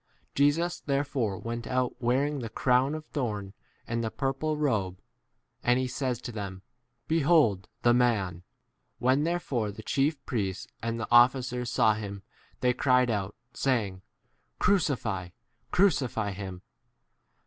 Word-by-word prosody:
Jesus 160 Hz, +5 st, +2 dB
therefore 140 Hz, -7 st, -1 dB
went 115 Hz, +2 st, -5 dB
out 130 Hz, -1 st, -1 dB
wearing 135 Hz, +4 st, +1 dB
the 115 Hz, -3 st, -5 dB
crown 130 Hz, +5 st, +2 dB
of 155 Hz, 0 st, -7 dB
thorn 105 Hz, -10 st, -3 dB, 0.3 s
and 115 Hz, 0 st, -2 dB
the 110 Hz, -, -1 dB
purple 140 Hz, +5 st, -1 dB
robe, 105 Hz, -11 st, 0 dB, 0.6 s
and 125 Hz, 0 st, +3 dB
he 130 Hz, 0 st, 0 dB
says 125 Hz, -1 st, -2 dB
to 120 Hz, -, -6 dB
them, 100 Hz, -4 st, -6 dB, 0.4 s
Behold 150 Hz, -, +3 dB, 0.2 s
the 120 Hz, -, +5 dB
man! 110 Hz, -8 st, +2 dB, 0.6 s
6 -, -, -50 dB
When 130 Hz, +4 st, +2 dB
therefore 140 Hz, -10 st, -1 dB
the 110 Hz, +2 st, -10 dB
chief 140 Hz, +5 st, +1 dB
priests 95 Hz, -6 st, -2 dB, 0.2 s
and 115 Hz, 0 st, -2 dB
the 110 Hz, -, -3 dB
officers 125 Hz, 0 st, +4 dB
saw 110 Hz, -, +4 dB
him 100 Hz, -2 st, -6 dB, 0.4 s
they 125 Hz, 0 st, +3 dB
cried 125 Hz, -1 st, +3 dB
out, 100 Hz, -2 st, -2 dB, 0.2 s
saying, 105 Hz, -9 st, 0 dB, 0.6 s
Crucify, 120 Hz, -, +1 dB, 0.4 s
crucify 130 Hz, -, +2 dB
[him]. 95 Hz, -2 st, -7 dB
125 Hz, 135 wpm, -28 LUFS, 105-140 Hz, 0.6 s, the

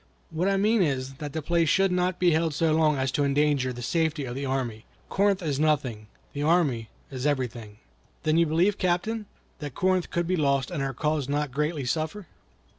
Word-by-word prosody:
"What 170 Hz, +4 st, 0 dB
I 195 Hz, -, +2 dB
mean 215 Hz, +2 st, +3 dB
is, 135 Hz, -5 st, -1 dB
that 150 Hz, -1 st, -5 dB
the 160 Hz, -1 st, -3 dB
place 170 Hz, 0 st, +2 dB
should 195 Hz, +2 st, +3 dB
not 180 Hz, 0 st, 0 dB
be 180 Hz, -1 st, +3 dB
held 160 Hz, -1 st, +1 dB
so 160 Hz, 0 st, +2 dB
long 155 Hz, -2 st, +3 dB
as 130 Hz, -1 st, 0 dB
to 145 Hz, -, +1 dB
endanger 140 Hz, -2 st, +2 dB
the 120 Hz, 0 st, -7 dB
safety 160 Hz, +1 st, 0 dB
of 120 Hz, -, -5 dB
the 135 Hz, +2 st, -3 dB
army. 125 Hz, -5 st, -2 dB, 0.3 s
Corinth 200 Hz, -1 st, +2 dB
is 145 Hz, -4 st, -1 dB
nothing; 130 Hz, -9 st, 0 dB, 0.3 s
the 145 Hz, -, -4 dB
army 145 Hz, -8 st, +2 dB, 0.2 s
is 130 Hz, +1 st, -2 dB
everything." 120 Hz, -7 st, -3 dB, 0.5 s
"Then 155 Hz, 0 st, +2 dB
you 170 Hz, 0 st, +4 dB
believe, 175 Hz, +6 st, +2 dB
Captain, 205 Hz, +5 st, -1 dB, 0.3 s
that 145 Hz, -4 st, -6 dB
Corinth 185 Hz, -1 st, +1 dB
could 170 Hz, 0 st, -1 dB
be 185 Hz, +2 st, 0 dB
lost, 140 Hz, -3 st, +1 dB
and 160 Hz, -5 st, -2 dB
our 135 Hz, -2 st, -2 dB
cause 150 Hz, -1 st, -1 dB
not 145 Hz, -1 st, -1 dB
greatly 150 Hz, +1 st, -1 dB
suffer?" 160 Hz, +9 st, -2 dB
150 Hz, 200 wpm, -26 LUFS, 135-175 Hz, 0.5 s, you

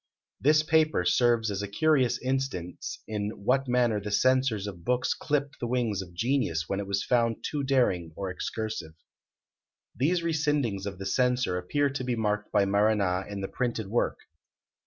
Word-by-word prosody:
This 150 Hz, +2 st, +4 dB
paper 155 Hz, -, +2 dB
serves 120 Hz, 0 st, +3 dB
as 100 Hz, 0 st, -2 dB
a 100 Hz, -, -3 dB
curious 130 Hz, +2 st, +2 dB
instance 130 Hz, -10 st, -3 dB
in 105 Hz, -1 st, -4 dB
what 135 Hz, +2 st, +2 dB
manner 120 Hz, -4 st, +2 dB
the 105 Hz, -, -5 dB
censors 130 Hz, -2 st, +2 dB
of 95 Hz, -5 st, -7 dB
books 125 Hz, +5 st, +1 dB
clipped 145 Hz, -1 st, -2 dB
the 120 Hz, -, -2 dB
wings 115 Hz, -5 st, 0 dB
of 90 Hz, -2 st, -11 dB
genius 115 Hz, -, 0 dB
when 100 Hz, -, -2 dB
it 100 Hz, -, -4 dB
was 100 Hz, 0 st, 0 dB
found 115 Hz, -2 st, +1 dB
too 150 Hz, -, -2 dB
daring 120 Hz, -12 st, +1 dB
or 95 Hz, -2 st, -4 dB
excursive. 105 Hz, -4 st, -4 dB, 1.0 s
These 170 Hz, +7 st, +1 dB
rescindings 150 Hz, -, 0 dB
of 95 Hz, -2 st, -5 dB
the 95 Hz, -, -6 dB
Censor 125 Hz, 0 st, +1 dB
appear 140 Hz, +11 st, 0 dB
to 135 Hz, -1 st, -4 dB
be 125 Hz, -1 st, -1 dB
marked 105 Hz, -2 st, -1 dB
by 100 Hz, -2 st, +3 dB
Marana 100 Hz, -2 st, +2 dB
in 100 Hz, -1 st, -5 dB
the 95 Hz, -, -2 dB
printed 115 Hz, -4 st, -3 dB
work. 120 Hz, +3 st, 0 dB
115 Hz, 170 wpm, -28 LUFS, 100-130 Hz, 1.0 s, This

